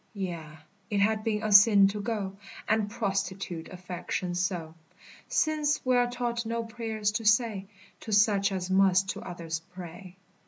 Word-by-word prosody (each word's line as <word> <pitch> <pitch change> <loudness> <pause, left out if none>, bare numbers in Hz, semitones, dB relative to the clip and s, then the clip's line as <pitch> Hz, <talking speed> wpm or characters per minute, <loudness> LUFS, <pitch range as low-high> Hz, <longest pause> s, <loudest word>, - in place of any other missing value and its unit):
Yea, 180 -5 -4 0.5
it 205 -2 0
had 215 +1 +2
been 215 -1 -1
a 215 - -1
sin 200 -1 +8
to 205 +1 -3
go 200 -3 -3 0.3
And 215 -1 +1
prostitute 195 -5 -3
affection 180 0 -4
so, 175 -3 -2 0.5
Since 300 -2 +1
we 255 0 +3
are 245 0 +3
taught 240 -1 -2
no 230 0 -2
prayers 225 -2 -2
to 225 +2 -3
say 215 -3 +2 0.3
To 220 - -8
such 205 -1 +3
as 185 -1 -3
must 190 0 +4
to - - -4
others 165 -3 -5 0.2
pray. 180 +1 -10
200 Hz, 155 wpm, -28 LUFS, 185-225 Hz, 0.5 s, sin